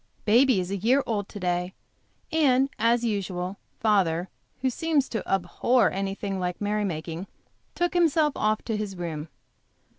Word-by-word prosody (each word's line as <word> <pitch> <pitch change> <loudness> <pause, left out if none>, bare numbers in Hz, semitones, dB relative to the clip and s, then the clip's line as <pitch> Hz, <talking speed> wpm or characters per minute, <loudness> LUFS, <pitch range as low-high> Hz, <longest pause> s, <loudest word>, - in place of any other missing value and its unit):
Baby 240 0 +5
is 180 +1 -3
a 200 - -1
year 250 +8 +3
old 205 -3 -2
to 205 - -8
day, 180 0 -1 0.6
and, 275 -4 +3
as 230 +1 +3
usual, 195 -4 -2 0.2
father, 190 -5 +2 0.3
who 260 - +2
seems 305 0 +1
to 225 - -2
abhor 235 +5 +2
anything 195 0 -3
like 180 -1 -2
a - - -4
merry 210 0 0
making, 165 +1 -4 0.5
took 350 0 0
himself 320 -4 +3
off 215 0 0
to 225 - -2
his 210 -2 -3
room. 165 -3 -4
205 Hz, 155 wpm, -26 LUFS, 185-250 Hz, 0.6 s, Baby